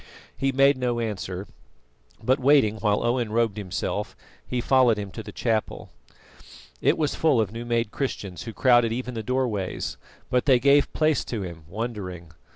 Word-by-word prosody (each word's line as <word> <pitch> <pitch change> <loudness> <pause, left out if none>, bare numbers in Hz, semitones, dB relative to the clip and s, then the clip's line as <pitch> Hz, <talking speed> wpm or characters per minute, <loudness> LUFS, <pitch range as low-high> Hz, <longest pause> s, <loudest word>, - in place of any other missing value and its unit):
He 135 0 0
made 135 +1 +4
no 120 -2 0
answer, 100 -4 -4 0.8
but 130 +4 +2
waiting 130 -5 +4
while 105 -1 +1
Owen 120 -2 0
robed 115 -2 +1
himself, 95 -4 -3 0.3
he 125 - -3
followed 125 -2 +4
him 100 -2 -5
to 110 - -7
the - - -9
chapel. 110 -3 -2 0.9
It - - +3
was 150 -2 0
full 150 -7 +2
of 105 -4 0
new 115 +1 -6
made 115 -2 0
Christians 100 -9 -4
who 115 - -5
crowded 120 -1 +4
even 125 +2 -3
the 115 - -3
doorways, 110 -5 -2 0.3
but 125 -1 +2
they 135 -3 +6
gave 140 +3 +4
place 155 -1 +2
to 110 -5 -4
him, 85 -3 -8
wondering. 95 -5 -5
115 Hz, 165 wpm, -25 LUFS, 105-130 Hz, 0.9 s, they